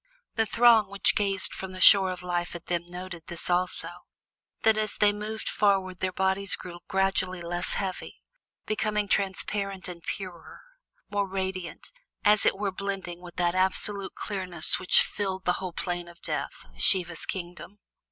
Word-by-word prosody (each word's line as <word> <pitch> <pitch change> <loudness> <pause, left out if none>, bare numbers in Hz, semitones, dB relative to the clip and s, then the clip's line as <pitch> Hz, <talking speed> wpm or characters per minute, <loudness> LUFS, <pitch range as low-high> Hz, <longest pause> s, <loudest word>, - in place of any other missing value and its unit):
The 225 -1 +1
throng 230 -3 +5
which 200 -1 +5
gazed 195 -2 +1
from 190 -1 -7
the 185 - -8
shore 190 0 +8
of 180 -1 -5
Life 175 -1 -2
at 170 - -8
them 175 -1 -2
noted 175 -1 -8
this 170 +1 -4
also: 180 +1 0 0.7
that 220 -1 +5
as 215 -1 0
they 205 -1 +4
moved 215 +1 -5
forward 190 -3 +1
their 185 0 -1
bodies 190 +1 +1
grew 175 -1 -10
gradually 185 -2 0
less 175 +1 0
heavy, 190 -2 -4 0.5
becoming 210 -1 -1
transparent 195 0 -2
and 175 -2 -8
purer, 180 -2 -7 0.5
more 200 -1 0
radiant, 190 -2 -5 0.3
and 210 - +7
as 210 - +4
it - - +2
were 200 -1 -1
blending 190 -2 -5
with 175 -1 -12
that 175 -1 +1
absolute 190 +1 0
clearness 185 -5 -1
which 185 - +5
filled 190 -2 -4
the 180 - +3
whole 185 -2 -4
Plain 175 0 -4
of 170 0 -15
Death, - - -4
Siva's 175 - +2
kingdom. 180 +2 -7
190 Hz, 160 wpm, -27 LUFS, 175-200 Hz, 0.7 s, shore